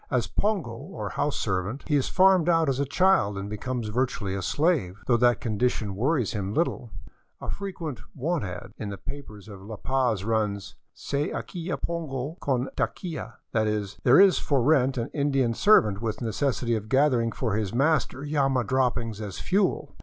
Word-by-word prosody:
As - - +1
pongo, 200 - -1
or 140 +12 -6
house 150 0 -1
servant, 95 +5 -2
he 150 - +2
is 140 - +2
farmed 185 -2 +4
out 165 -3 +3
as 135 0 0
a 140 - +1
child 160 - +3
and 100 +1 -4
becomes 110 +2 -4
virtually 110 -4 -1
a 100 - -2
slave, 120 - 0
— - - -23
though 125 - +3
that 120 0 +3
condition 110 -2 -1
wor 125 +11 +1
ries 125 -9 0
him 100 -1 -3
little. 160 -7 0 0.5
A - - -5
frequent 170 - -5
" - - -38
want 155 +4 -1
ad." 90 -3 -6
in 105 - -4
the 100 - -5
papers 110 -5 -9
of 100 -3 -10
La 110 +3 -7
Paz 125 -3 0
runs: 105 -3 -1
*'* - - -50
Se 145 +1 -2
alquila 175 -1 -4
pongo 155 -3 -3
con 130 -2 0
taquia," 170 -4 -3 0.2
that 110 -1 +1
is, 105 -2 -2
there 125 +6 +6
is 195 -1 +6
for 135 -4 +1
rent 135 -2 +3
an 115 +1 -2
Indian 135 -5 +1
serv 210 - +6
ant 105 -1 -3
with 110 -2 -2
necessity 120 +1 -1
of 110 0 -5
gathering 130 -4 +3
for 115 -4 -2
his 105 -3 -1
master 140 +1 +1
llama 135 -4 +1
droppings 120 -2 0
as 100 -4 -6
fuel. 195 +1 0
125 Hz, 190 wpm, -26 LUFS, 110-150 Hz, 0.5 s, there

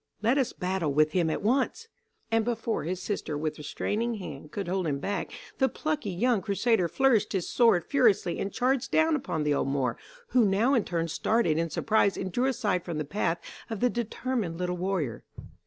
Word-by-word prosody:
Let 245 +6 +3
us 260 - +1
battle 180 -4 -1
with 155 +2 +3
him 170 -1 +1
at 160 - -2
once." 265 - +1 0.4
And 225 0 +3
before 225 -7 -2
his 180 +2 -2
sister 180 -6 -3
with 155 0 -3
restraining 225 +10 -2
hand, 180 -6 -8
could 200 -3 -4
hold 185 -1 -1
him 140 -2 0
back 200 +8 -3 0.3
the 265 - +4
plucky 305 -8 -2
young 215 +4 +1
crusader 200 -2 +1
flourished 230 0 +2
his 190 -3 -1
sword 225 -9 +3
furiously 220 -10 +2
and 200 - -2
charged 255 0 0
down 320 0 +3
upon 215 - -2
the 150 -1 +2
old 140 - 0
Moor, 135 -3 -1 0.3
who 250 - +4
now 210 +6 +3
in 240 -6 +2
turn 170 -1 -1
started 165 0 +1
in 165 0 0
surprise 200 +4 +2
and 185 -1 -3
drew 245 +8 +1
aside 205 -9 0
from 170 -3 -4
the 155 - -2
path 165 +1 0 0.3
of 225 -3 -4
the 245 +2 +2
determined 235 -5 -2
little 180 0 -1
warrior. 180 - -2
195 Hz, 195 wpm, -28 LUFS, 170-235 Hz, 0.4 s, the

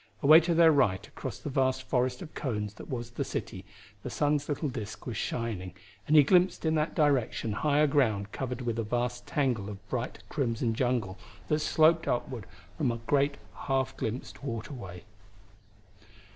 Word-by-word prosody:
Away 155 +3 +9
to 170 0 0
their 165 -1 +7
right 100 -11 +2
across - - -6
the 145 - -6
vast 130 -1 +1
forest 125 +2 0
of 160 - -11
cones 105 -6 -3
that - - -11
was 120 -2 -4
the - - -2
city - - -5 0.4
the - - -5
sun's 145 0 0
little 145 +1 -1
disk 110 -5 -6
was 120 - -4
shining, 100 -5 -3 0.3
and 155 - +3
he 150 - +9
glimpsed 180 +3 +3
in 160 - +2
that 155 0 0
direction 140 -7 +1
higher 150 +7 +2
ground 110 -9 +1
covered 125 -1 -4
with 115 -2 -2
a - - 0
vast 120 +2 -2
tangle 125 -8 0
of 100 -1 -10
bright 125 -1 -4
crimson 115 -4 -1
jungle 115 -5 -1 0.3
that 150 - +2
sloped 160 +2 +3
upward 120 -3 -2 0.3
from 135 -6 +2
a 115 - -3
great, 140 +4 +1 0.2
half 135 -1 -1
glimpsed 120 +4 -5
waterway. 115 -7 -6
130 Hz, 170 wpm, -29 LUFS, 115-145 Hz, 0.4 s, Away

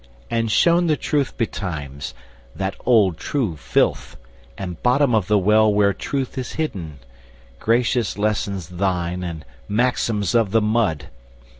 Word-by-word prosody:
and 115 -1 0
shown 170 +7 +4
the 155 -2 +2
truth 145 -3 -1
betimes, 75 - -4 0.4
That 95 0 -2
old 105 -9 +4
true 120 - -1
filth, - - 0 0.4
and 90 -4 -6
bottom 125 +1 +3
of 105 -5 +2
the 105 - +3
well 105 +2 +4
Where 100 -1 +3
Truth 135 +5 -3
is 125 - -5
hidden. 90 - -4 0.6
Gracious 120 -1 +1
lessons 100 -4 -1
thine 90 -1 -1
And 80 -4 -6 0.2
maxims 110 -2 +1
of 115 -4 +3
the 110 +3 +3
mud! 105 -9 0
105 Hz, 135 wpm, -21 LUFS, 90-120 Hz, 0.6 s, shown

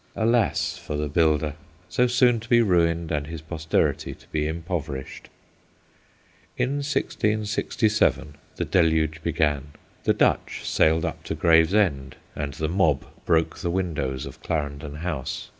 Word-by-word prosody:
Alas 115 -1 +1
for 75 - -5
the 75 0 -1
builder, 75 -1 +2 0.3
so 125 - +2
soon 125 -1 +3
to 110 +1 -12
be 120 - +6
ruined, 85 -6 +2
and 75 -2 -1
his 80 0 -6
posterity 80 +1 -1
to - - -21
be 75 -1 -1
impoverished! 80 -4 -5 1.3
In 135 +3 0
1667 110 - 0 0.2
the - - -2
deluge 80 -2 +2
began. 75 -4 0 0.4
The - - +3
Dutcl* - - +1
sailed 80 +1 +3
up - - -5
to - - -3
Gravesend, 80 -5 +3 0.2
and 70 -2 -4
the 80 - -2
mob 80 -5 +2 0.2
broke 80 -2 +2
the 90 - -2
windows 75 -8 -2
of - - -10
Clarendon 70 -2 -3
House. 75 -5 -4
80 Hz, 135 wpm, -25 LUFS, 75-95 Hz, 1.3 s, be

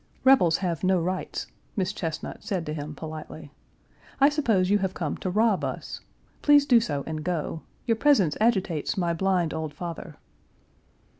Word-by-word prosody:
"Rebels 260 -12 +5
have 170 -2 -2
no 185 0 +3
rights," 180 +2 -3 0.3
Miss 195 -1 -1
Chesnut 165 -5 -5
said 185 -5 -2
to 150 - -4
him 150 0 -6
politely. 155 -1 -8 0.7
"I 280 +1 +7
suppose 225 -11 +1
you 205 - +4
have 190 -1 -2
come 155 -5 -2
to 185 - -3
rob 210 +1 +2
us. - - -5 0.4
Please 290 -1 +6
do 245 -4 +6
so 145 -11 -2
and 155 -1 -4
go. 165 -2 -2 0.2
Your 230 -2 +1
presence 225 - +3
agitates 190 -10 +1
my 175 -2 +1
blind 180 -2 +1
old 160 -2 -4
father." 170 -2 -7
180 Hz, 160 wpm, -26 LUFS, 160-210 Hz, 0.7 s, I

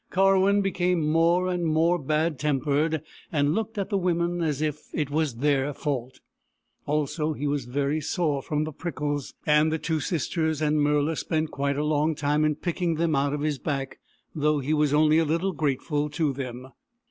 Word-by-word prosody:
Karwin 195 +1 +3
became 180 -4 +1
more 170 +3 +3
and 180 -1 -1
more 165 +2 +2
bad 155 +1 0
tempered, 150 +2 0 0.3
and 145 -1 +2
looked 225 +3 -3
at 200 +1 -2
the 200 - +2
women 175 -1 0
as 150 -4 0
if 150 -1 -2
it 150 -3 -2
was 150 -4 0
their 140 +2 +1
fault. 130 -4 -4 0.7
Also, 150 +1 0
he 145 - -5
was 145 -3 -1
very 140 +4 -1
sore 150 -3 -1
from 150 +2 -1
the 155 - -4
prickles, 145 -3 -4
and 150 +1 +4
the 160 - 0
two 160 0 -1
sisters 160 -1 -1
and 155 0 +1
Murla 150 +2 +2
spent 155 0 -1
quite 140 0 -1
a 150 - 0
long 150 +1 +1
time 145 +1 +1
in 155 -1 +2
picking 170 +1 -1
them 160 -1 +1
out 140 +1 +1
of 145 - -2
his 150 -2 -1
back, 135 -3 -3 0.3
though 150 0 +1
he 145 +2 -1
was 150 -2 +2
only 155 +1 +4
a - - +3
little 165 +5 0
grateful 150 0 -1
to 150 -2 0
them. 130 -1 -6
150 Hz, 185 wpm, -26 LUFS, 145-165 Hz, 0.7 s, and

